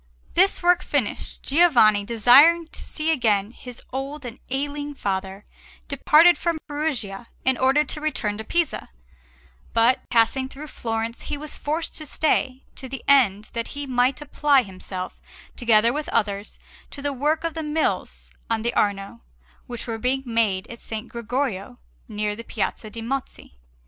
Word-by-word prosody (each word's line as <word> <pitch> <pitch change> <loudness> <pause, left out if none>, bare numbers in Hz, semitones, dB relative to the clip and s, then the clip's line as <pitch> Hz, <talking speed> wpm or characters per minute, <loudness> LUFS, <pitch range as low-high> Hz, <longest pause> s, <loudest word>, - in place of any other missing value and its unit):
This 375 +1 +3
work 355 0 +4
finished, 275 - -2
Giovanni, 255 -10 +5
desiring 255 +10 +6
to - - -8
see 310 +1 -2
again 220 -8 +1
his 245 -1 -11
old 275 +2 -5
and 245 +1 -8
ailing 290 +2 -3
father, 195 -2 -3 0.4
departed 310 +5 +5
from 340 -2 0
Perugia 265 -9 -3 0.2
in 260 0 +4
order 265 +4 +3
to 300 +1 -5
return 220 -9 -1
to - - -4
Pisa; 335 +6 -1 0.8
but, 230 +3 +3
passing 255 +3 +2
through 295 +3 -9
Florence, 225 0 -3
he 295 - -2
was 300 +1 -6
forced 315 +3 -3
to 310 - -7
stay, 265 -3 0
to 260 - -7
the 270 0 -6
end 215 -7 +4
that 230 -1 -2
he 285 - -3
might 255 0 +1
apply 285 -2 +3
himself, 185 -2 -7 0.4
together 230 -1 +4
with 300 0 -3
others, 205 -2 -1 0.3
to 280 - -9
the 285 -1 0
work 300 +5 0
of 330 -1 -2
the 320 - -4
Mills 310 +1 -2 0.2
on 225 -1 0
the 235 +1 0
Arno, 195 - -1 0.5
which 240 -1 -5
were 225 -2 -4
being 260 +3 0
made 225 -6 +1
at 235 - -10
S. - - -9 0.2
Gregorio 235 -3 -3 0.3
near 210 0 -2
the 230 - -8
Piazza 220 - -3
de' 225 +2 -7
Mozzi. 265 - -5
255 Hz, 160 wpm, -23 LUFS, 220-295 Hz, 0.8 s, desiring